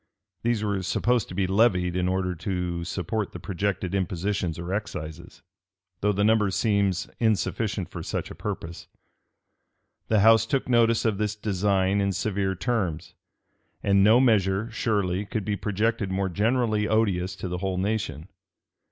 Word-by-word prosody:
These 115 -2 0
were 100 -2 -1
supposed 120 +5 +1
to 90 - -8
be 95 0 +1
levied 95 -3 +2
in 90 0 +1
order 90 0 0
to 90 0 -3
support 95 +4 -3
the - - -7
projected 95 -1 -2
impositions 95 -2 -1
or 85 +2 -4
excises, 85 -5 -6 0.6
though 105 - +2
the 100 0 0
number 110 -1 +3
seems 100 -2 +1
insufficient 105 -3 0
for - - -6
such - - -4
a - - -6
purpose,[*] 85 +1 -6 1.2
The 110 -2 +3
house 115 +1 +6
took 135 +1 0
notice 115 -2 +3
of 105 -3 +1
this 105 0 -1
design 100 -1 +1
in 100 0 +1
severe 95 -1 -1
terms: 90 -7 -2 0.7
and 100 -1 +4
no 110 +4 +6
measure, 110 -3 +2
surely, 100 -4 0
could 105 0 -4
be 105 0 0
projected 105 +1 -1
more 95 0 -1
generally 110 +2 +1
odious 100 -5 +1
to - - -5
the 90 0 -3
whole 95 0 -2
nation. 100 -4 -2
100 Hz, 150 wpm, -26 LUFS, 90-110 Hz, 1.2 s, house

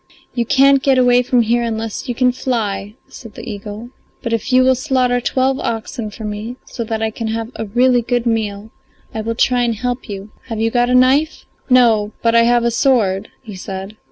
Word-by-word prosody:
"You 235 -2 -1
can't 275 0 +5
get 265 0 +3
away 245 -1 +4
from 250 -1 +2
here 235 +2 +1
unless 225 +1 -4
you 245 - -2
can 250 0 +3
fly," 215 -5 -3
said 225 -4 -12
the 235 - -9
eagle, 210 +2 -7 0.3
"but 230 -2 -2
if 230 +3 -2
you 255 0 +5
will 260 0 +4
slaughter 255 -2 0
twelve 265 +2 0
oxen 225 0 -4
for 215 +2 -10
me, 210 +3 -5
so 235 - -5
that 225 0 -3
I 220 - 0
can 225 +1 -5
have 225 +1 -3
a 225 - -4
really 245 +3 +3
good 240 0 -1
meal, 220 -2 -2 0.4
I 220 - -3
will 230 +1 -3
try 245 +2 +2
and 235 -2 0
help 245 +2 -4
you. 200 +1 -7 0.2
Have 225 -3 -4
you 225 0 +1
got 245 0 +2
a 250 - +3
knife?" 265 +5 +3 0.2
"No, 225 -4 +4
but 230 0 +3
I 230 0 +5
have 240 0 +3
a 235 - +1
sword," 220 -6 +1
he 215 - -9
said. 190 +2 -7
235 Hz, 215 wpm, -18 LUFS, 220-250 Hz, 0.4 s, can't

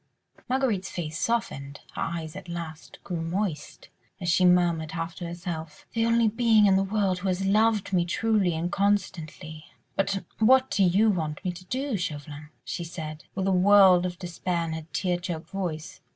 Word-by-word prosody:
Marguerite's 250 -8 0
face 160 -2 -4
softened, 145 -12 -2
her - - -5
eyes 160 -1 -3
at 190 -2 -9
last 170 -2 -7
grew 175 -3 -3
moist, 165 -2 -3 0.3
as 175 -2 -2
she 180 +2 +4
murmured, 170 -3 +3
half 165 0 -3
to 175 - -5
herself: 170 -3 -6
"The 230 0 +1
only 230 0 +4
being 225 -1 +4
in 195 -1 +5
the 190 - +3
world 195 -2 0
who 195 - -3
has 190 +1 0
loved 210 0 +2
me 175 -2 +4
truly 200 -2 +1
and 170 +2 -2
constantly.... 170 -6 -1 0.3
But 195 0 0 0.2
what 260 +4 +5
do 200 - +3
you 205 +5 +4
want 160 -2 -3
me 180 - +1
to 175 +1 -11
do, 260 +2 -2
Chauvelin?" 150 -3 -5 0.2
she 175 - -4
said, 155 -2 -7
with 190 -1 -1
a 195 - +2
world 185 -1 +6
of 175 -1 -7
despair 175 -1 -2
in 160 - -4
her 160 -1 -6
tear 180 -2 0
choked 175 -2 -6
voice. 170 -5 -4
180 Hz, 180 wpm, -27 LUFS, 165-200 Hz, 0.3 s, world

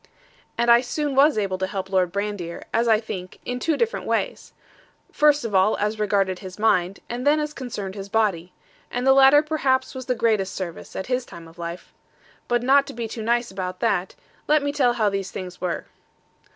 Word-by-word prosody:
And 235 0 +3
I 235 0 +7
soon 290 +3 -2
was 275 0 +5
able 195 -3 -1
to 190 - -1
help 190 -1 -4
Lord 185 -2 +1
Brandir, 200 -3 -4
as 235 +1 +2
I 220 -2 +5
think, 185 -5 -7
in 250 0 -3
two 315 +2 0
different 460 0 -1
ways; - - -2 0.6
first 295 -3 +3
of 220 - -4
all 190 +3 +3
as 210 +1 -1
regarded 195 -3 +1
his 185 -1 -9
mind, 195 -3 +1
and 240 +1 -4
then 295 +2 +4
as 300 0 -3
concerned 210 -8 -5
his 200 0 -8
body: 195 -5 0 0.4
and 245 +1 -3
the 265 - +6
latter 270 +2 +7
perhaps 265 -4 0
was 260 -2 -7
the 250 - +1
greatest 210 -6 +1
service, 175 -3 -6
at 190 - -3
his 250 0 -1
time 170 -7 -12
of 165 +2 -17
life. 170 +1 -7 0.5
But 240 0 +1
not 275 +2 +4
to - - -7
be 230 -1 -4
too 225 +1 -6
nice 235 +1 0
about 185 -1 -5
that; 195 -5 0 0.3
let 300 -1 +3
me 285 - 0
tell 255 -4 +2
how 220 -3 +1
these 195 -1 -3
things 180 -2 -8
were. 180 -2 -2
220 Hz, 205 wpm, -23 LUFS, 190-260 Hz, 0.6 s, I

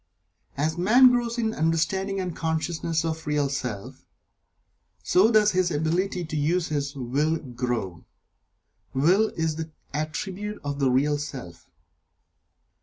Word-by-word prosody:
As 160 +4 -1
man 245 +7 +7
grows 240 -1 0
in 220 -2 0
understanding 190 +5 0
and 180 -3 -3
consciousness 160 0 -1
of 160 -1 -1
the - - -15
Real 145 -2 +1
Self, 125 -7 -5 1.0
so 190 +5 +4
does 210 -1 +5
his 185 -1 +2
ability 175 +4 -1
to 155 - -6
use 165 +4 +1
his 145 -1 -2
Will 140 +5 0
grow. 120 - -4 0.9
Will 180 +11 +4
is 160 -1 -1
the 160 0 -4 0.2
attribute 190 +7 -4
of 145 0 -3
the 135 -2 +3
Real 145 +3 +2
Self. 130 - -8
160 Hz, 130 wpm, -25 LUFS, 145-185 Hz, 1.0 s, man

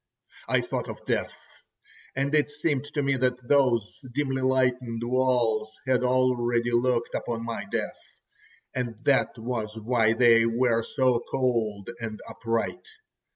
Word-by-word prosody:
I - - +3
thought - - -4
of - - -8
death, - - -1 0.8
and 140 +2 -1
it 150 -1 +3
seemed 145 -1 -1
to 145 0 -2
me 135 -1 +1
that 125 -1 -1
those 125 -7 +2 0.2
dimly 135 -2 0
lightened 125 -3 +1
walls 120 -3 +1
had 130 -2 +2
already 120 -2 +2
looked 120 0 +1
upon 115 -1 -3
my 115 -3 -4
death, - - -2 0.7
and 120 -3 -3
that 140 -3 +2
was 110 -2 -4
why 115 0 +2
they 115 -1 +5
were 115 0 +2
so 130 0 +1
cold 115 -5 -1
and 110 -2 -5
upright. 115 - -3
125 Hz, 135 wpm, -26 LUFS, 115-130 Hz, 0.8 s, they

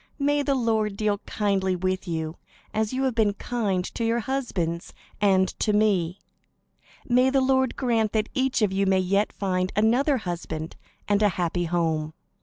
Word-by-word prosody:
May 290 0 +1
the 280 -1 +1
Lord 220 -4 0
deal 210 -1 0
kindly 195 -3 0
with 185 +1 -2
you, 160 -1 -3 0.4
as 215 0 0
you 260 +1 -1
have 260 -2 +1
been 215 -3 +2
kind 200 -6 -1
to 230 - -3
your 230 +1 +1
husbands 195 -11 -3 0.3
and 190 -2 +4
to 210 - +1
me. 195 -5 +2 0.9
May 250 +1 +4
the 270 0 +2
Lord 260 -1 +2
grant 230 -5 +1
that 215 -1 +1
each 260 -4 +1
of 205 - +2
you 195 0 +1
may 190 0 +4
yet 195 +3 +1
find 185 -2 -1
another 250 +7 +3
husband 170 -5 -5 0.3
and 205 0 +2
a 210 - +5
happy 175 -1 -1
home." 160 -2 -1
205 Hz, 170 wpm, -25 LUFS, 185-240 Hz, 0.9 s, a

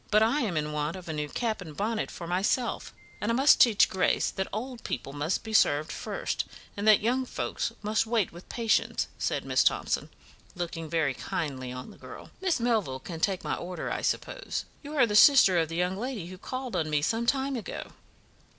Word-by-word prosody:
"But 215 0 +5
I 235 +7 +2
am 195 - -1
in 150 0 -1
want 150 +2 -2
of 185 -2 -9
a 160 - -3
new 150 -1 -3
cap 220 +4 -2
and 155 -5 -9
bonnet 220 +2 -1
for 170 - -8
myself, 190 +8 0 0.3
and 210 - 0
I - - +1
must 275 +4 +6
teach 225 -4 +6
Grace 190 - +1
that 190 - -3
old 240 +3 -5
people 135 +2 -4
must 150 +5 -1
be 220 -1 -6
served 150 -7 +3
first, - - -3 0.3
and 205 +1 -2
that 215 -2 +7
young 250 +4 +1
folks 255 - -3
must 215 +2 +1
wait 225 -4 +1
with 175 +2 -13
patience," 230 -2 +1
said - - -1
Miss - - +3
Thomson, - - +1 0.5
looking 165 -2 -4
very 155 -4 +1
kindly 130 -2 -4
on 125 0 -7
the - - -17
girl. - - -11
"Miss 370 -7 +1
Melville 220 - 0
can 165 +4 -7
take 190 +2 0
my - - -1
order, 180 0 -4
I - - -2
suppose? - - -2 0.2
You 295 +1 -7
are 255 - +6
the 210 -2 -2
sister 210 - +7
of 160 -1 0
the 165 - -5
young 180 +2 0
lady 235 -5 -4
who 185 +1 -10
called 255 -1 -5
on 160 -3 0
me 150 -1 +1
some 230 +6 0
time 270 +1 +1
ago?" 235 - -6
195 Hz, 210 wpm, -28 LUFS, 165-235 Hz, 0.5 s, that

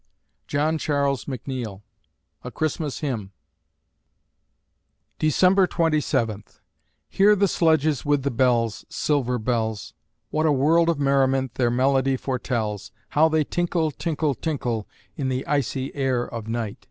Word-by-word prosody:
JOHN 155 +2 0
CHARLES 140 -3 0
MCNEILL 125 -6 -5 0.6
(A 125 - -5
Christmas 150 -2 -3
Hymn) 110 -9 -3 1.9
December 180 +5 +4
Twenty 160 -3 +1
Seventh 110 -6 -2 0.5
Hear 205 +2 +4
the 200 0 +3
sledges 160 -4 +2
with 145 -2 +1
the 140 - 0
bells 120 -3 +1
Silver 145 -5 0
bells! 110 -2 -2 0.4
What 155 +1 +1
a - - +4
world 160 +5 +3
of 165 - +1
merriment 135 -2 +2
their 120 -2 +1
melody 135 +2 +2
foretells! 115 -6 -3 0.2
How 160 +2 +4
they 155 -1 +2
tinkle, 170 0 -1
tinkle, 155 0 -1
tinkle, 125 -6 -3 0.3
In 135 -2 -1
the 130 +1 -2
icy 135 -2 -1
air 130 -3 0
of 115 -3 -7
night! 115 -2 -3
135 Hz, 130 wpm, -24 LUFS, 120-155 Hz, 1.9 s, December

